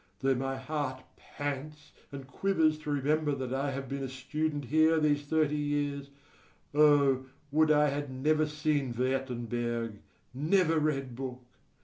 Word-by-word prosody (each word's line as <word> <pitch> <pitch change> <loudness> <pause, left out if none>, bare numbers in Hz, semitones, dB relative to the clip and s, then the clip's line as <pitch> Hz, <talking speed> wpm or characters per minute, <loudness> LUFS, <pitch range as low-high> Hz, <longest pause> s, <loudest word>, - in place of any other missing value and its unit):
Though 135 0 +3
my 135 +1 -2
heart 130 -1 -3
pants 145 +1 -6 0.2
and 140 -1 -7
quivers 160 0 +1
to 155 - -7
remember 145 +1 +1
that 130 -2 -4
I 135 +2 0
have 135 0 -4
been 140 +2 -4
a 135 - -3
student 145 +3 -3
here 155 +4 +4
these 145 -1 +1
thirty 155 -1 +2
years, 145 -1 -2 0.6
O, 140 -3 +4 0.2
would 155 +1 +4
I 150 -1 +5
had 145 0 -3
never 155 +4 +1
seen 150 -4 -1
Wertenberg, 120 -3 -2 0.3
never 160 +4 +2
read 135 -5 -1
book! 130 -1 -6
145 Hz, 140 wpm, -30 LUFS, 130-150 Hz, 0.6 s, I